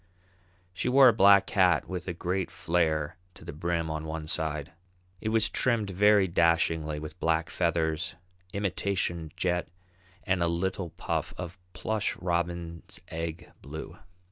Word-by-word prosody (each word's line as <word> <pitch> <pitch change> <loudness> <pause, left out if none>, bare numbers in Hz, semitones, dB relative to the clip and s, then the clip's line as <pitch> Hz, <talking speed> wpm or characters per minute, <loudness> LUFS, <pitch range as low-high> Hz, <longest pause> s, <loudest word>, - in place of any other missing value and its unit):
She 90 - -1
wore 135 0 +8
a - - +3
black 100 -2 +6
hat 90 -5 +3
with 90 0 -5
a 90 - -2
great 90 +2 -2
flare 80 -2 0 0.2
to - - -13
the - - -6
brim 85 +1 -1
on 80 0 -3
one 80 0 -4
side. 75 0 -2 0.5
It 110 - -2
was 110 -1 +4
trimmed 110 -2 0
very 100 +1 +5
dashingly 80 -2 +2
with 80 +3 -8
black 80 0 +1
feathers, 85 0 0 0.4
imitation 95 -4 -2
jet, 90 -1 0 0.6
and 95 -2 +1
a 85 - +3
little 85 +1 -1
puff - - -3
of 90 +1 -7
plush 105 +3 -1
robin's 85 -1 -3
egg 80 +1 -5
blue. 80 +3 -8
85 Hz, 140 wpm, -28 LUFS, 80-95 Hz, 0.6 s, wore